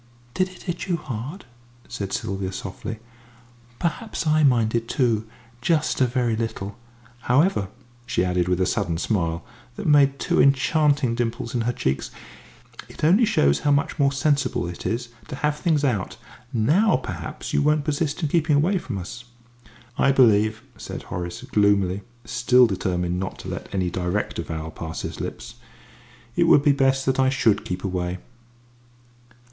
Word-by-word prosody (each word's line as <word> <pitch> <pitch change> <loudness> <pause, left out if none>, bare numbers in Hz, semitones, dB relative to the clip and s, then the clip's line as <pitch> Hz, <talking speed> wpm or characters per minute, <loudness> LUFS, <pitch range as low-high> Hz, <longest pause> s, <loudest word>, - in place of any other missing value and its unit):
"Did 185 0 +1
it 185 - -14
hit 175 +1 -4
you 175 -2 +1
hard?" 135 - -6 0.4
said 100 -1 -5
Sylvia, 95 -1 -3
softly. 100 +4 -6 0.8
"Perhaps 210 +4 -3
I 155 0 +3
minded 115 -4 +2
too, 115 -5 +1 0.3
just 155 0 +1
a 130 - +5
very 120 -2 0
little. 110 -3 -4 0.4
However," 130 - +2 0.4
she 90 - +1
added, 90 -1 0
with 90 0 +1
a 95 - +3
sudden 85 -2 -1
smile, 85 -4 -1 0.3
that - - -6
made 140 -2 +5
two - - +2
enchanting 140 -1 +3
dimples 115 -1 -2
in 120 - 0
her 120 +2 0
cheeks, 70 - -2 0.8
"it - - -12
only 190 +10 +5
shows 70 - +3
how 145 - 0
much 140 +2 +1
more 140 -1 +4
sensible 140 - 0
it 85 - -5
is 120 +1 -2 0.2
to 145 - -6
have 150 +2 0
things 155 -3 +1
out. 110 -8 -1 0.3
Now 150 - +3
perhaps 90 -11 -5
you - - +3
won't 150 0 +2
persist 150 +1 -1
in 155 - +1
keeping 160 -1 +2
away 180 +7 +2
from 120 -11 -5
us?" 95 +6 -7 0.7
"I 135 - +5
believe," 110 -4 +4
said - - -7
Horace, 90 +7 -5
gloomily, 100 -6 +2 0.2
still 125 +1 +4
determined 90 -3 -1
not 95 0 -4
to - - -8
let - - -6
any 90 -3 -1
direct 90 +2 -2
avowal 80 -1 -5
pass 80 0 -6
his - - -5
lips, - - -7 0.8
"it - - +3
would 145 - +6
be 145 - +5
best 135 -1 +2
that 130 0 +1
I 130 0 +4
should 125 -6 +2
keep 90 - -4
away." 90 -2 -2
120 Hz, 160 wpm, -24 LUFS, 95-145 Hz, 0.8 s, would